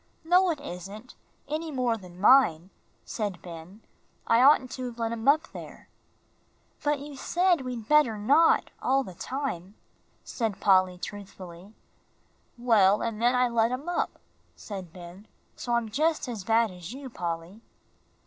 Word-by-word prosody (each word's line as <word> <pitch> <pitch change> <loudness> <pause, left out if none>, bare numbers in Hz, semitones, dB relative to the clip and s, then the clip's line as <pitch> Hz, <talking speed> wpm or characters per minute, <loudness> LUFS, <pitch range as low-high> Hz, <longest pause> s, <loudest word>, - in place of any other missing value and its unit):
"No, 360 +3 +4
it 315 -4 -2
isn't, 205 0 -9 0.3
any 310 +3 -3
more 250 -5 0
than 180 -4 -12
mine," 190 -6 +4 0.3
said 205 -6 -4
Ben. 175 +5 -11 0.4
"I 230 +1 +4
oughtn't 260 -2 +5
to 255 - -5
have 240 -1 -9
let 230 -1 -2
him 230 +2 -5
up 305 +3 +4
there." - - -11 0.9
"But 295 0 +1
you 285 +1 -9
said 350 +3 +1
we 255 -1 -4
better 235 0 +2
not, 285 +11 +3
all 270 +1 +2
the 185 - -10
time," 205 - -5 0.5
said 225 -5 -3
Polly, 185 -2 +3
truthfully. 190 0 -10 0.8
"Well, 210 -5 +4
and 230 -1 -3
then 245 +2 +3
I 250 0 +3
let 230 -1 +2
him 255 +6 -5
up," 350 - -2 0.4
said 190 -5 -8
Ben, 180 +4 -12 0.3
"so 240 - -4
I'm 235 -1 0
just 310 +5 0
as 225 -6 -5
bad 225 -1 +2
as 180 +3 -9
you, 270 +1 -8
Polly." 175 -1 -5
230 Hz, 150 wpm, -27 LUFS, 190-270 Hz, 0.9 s, oughtn't